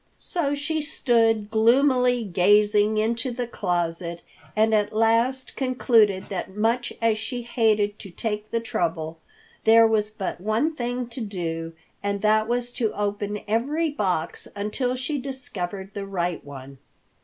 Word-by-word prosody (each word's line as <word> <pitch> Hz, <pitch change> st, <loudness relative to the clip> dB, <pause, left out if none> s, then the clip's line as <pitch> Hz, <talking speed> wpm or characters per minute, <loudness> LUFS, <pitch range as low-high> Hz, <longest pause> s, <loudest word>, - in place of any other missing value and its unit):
So 295 Hz, -6 st, -1 dB
she 310 Hz, +2 st, -1 dB
stood 225 Hz, -7 st, +1 dB
gloomily 250 Hz, +2 st, +4 dB
gazing 205 Hz, +3 st, +3 dB
into 230 Hz, +3 st, 0 dB
the 245 Hz, 0 st, -3 dB
closet 175 Hz, -5 st, -2 dB, 0.3 s
and 220 Hz, +1 st, +3 dB
at 210 Hz, -1 st, +2 dB
last 230 Hz, +4 st, +2 dB
concluded 230 Hz, -7 st, +2 dB
that 190 Hz, 0 st, -5 dB
much 230 Hz, +3 st, +1 dB
as 220 Hz, -1 st, +3 dB
she 245 Hz, +2 st, -4 dB
hated 215 Hz, -3 st, +1 dB
to 200 Hz, -, -9 dB
take 210 Hz, +3 st, -4 dB
the 230 Hz, -, 0 dB
trouble, 165 Hz, -8 st, -2 dB, 0.4 s
there 225 Hz, +1 st, +7 dB
was 215 Hz, -1 st, +2 dB
but 195 Hz, -4 st, -5 dB
one 220 Hz, -, +1 dB
thing 245 Hz, -1 st, -2 dB
to 245 Hz, +2 st, -7 dB
do 165 Hz, -6 st, -4 dB, 0.3 s
and 200 Hz, 0 st, -2 dB
that 215 Hz, +1 st, +3 dB
was 245 Hz, +1 st, -1 dB
to 230 Hz, -3 st, -1 dB
open 205 Hz, 0 st, -2 dB
every 290 Hz, +9 st, 0 dB
box 180 Hz, -, -2 dB
until 215 Hz, +5 st, -1 dB
she 270 Hz, +3 st, -2 dB
discovered 205 Hz, -8 st, -6 dB
the 200 Hz, -1 st, -5 dB
right 175 Hz, -3 st, -2 dB
one. 135 Hz, -1 st, -10 dB
220 Hz, 145 wpm, -24 LUFS, 200-245 Hz, 0.4 s, there